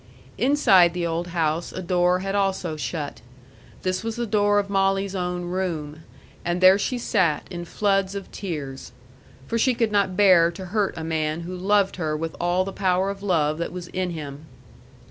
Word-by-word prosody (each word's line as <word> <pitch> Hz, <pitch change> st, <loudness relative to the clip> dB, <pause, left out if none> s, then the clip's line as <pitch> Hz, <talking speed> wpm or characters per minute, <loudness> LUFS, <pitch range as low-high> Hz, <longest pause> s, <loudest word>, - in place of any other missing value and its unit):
Inside 210 Hz, -10 st, +5 dB
the 175 Hz, -1 st, -1 dB
old 170 Hz, +1 st, -2 dB
house 165 Hz, -1 st, -1 dB
a -, -, -6 dB
door 180 Hz, 0 st, +2 dB
had 195 Hz, +1 st, -3 dB
also 190 Hz, -5 st, 0 dB
shut. 150 Hz, -5 st, -5 dB, 0.6 s
This 185 Hz, +2 st, -1 dB
was 225 Hz, -1 st, -3 dB
the 240 Hz, 0 st, -2 dB
door 205 Hz, -1 st, +2 dB
of 205 Hz, -1 st, +1 dB
Molly's 195 Hz, 0 st, +1 dB
own 180 Hz, -1 st, -2 dB
room. 165 Hz, -4 st, -3 dB, 0.4 s
And 175 Hz, +1 st, -1 dB
there 185 Hz, +2 st, +7 dB
she 250 Hz, +4 st, -1 dB
sat, 170 Hz, -10 st, +1 dB
in 175 Hz, -1 st, -5 dB
floods 195 Hz, +1 st, 0 dB
of 200 Hz, -1 st, -7 dB
tears. 145 Hz, -, -6 dB, 0.5 s
For 230 Hz, -, -1 dB
she 255 Hz, +2 st, +3 dB
could 230 Hz, -2 st, +1 dB
not 200 Hz, -3 st, +1 dB
bear 185 Hz, -5 st, +6 dB
to 190 Hz, +2 st, -8 dB
hurt 210 Hz, -3 st, +1 dB
a 160 Hz, -, -4 dB
man 160 Hz, 0 st, -1 dB
who 180 Hz, +2 st, -6 dB
loved 195 Hz, +1 st, +1 dB
her 155 Hz, -3 st, -1 dB
with 160 Hz, +1 st, -4 dB
all 175 Hz, +2 st, +1 dB
the 195 Hz, -, -5 dB
power 190 Hz, 0 st, +1 dB
of 195 Hz, 0 st, -9 dB
love 160 Hz, -6 st, +1 dB
that 170 Hz, -, -3 dB
was 180 Hz, -1 st, -7 dB
in 185 Hz, -1 st, -2 dB
him. 150 Hz, -2 st, -7 dB
180 Hz, 185 wpm, -24 LUFS, 165-195 Hz, 0.6 s, there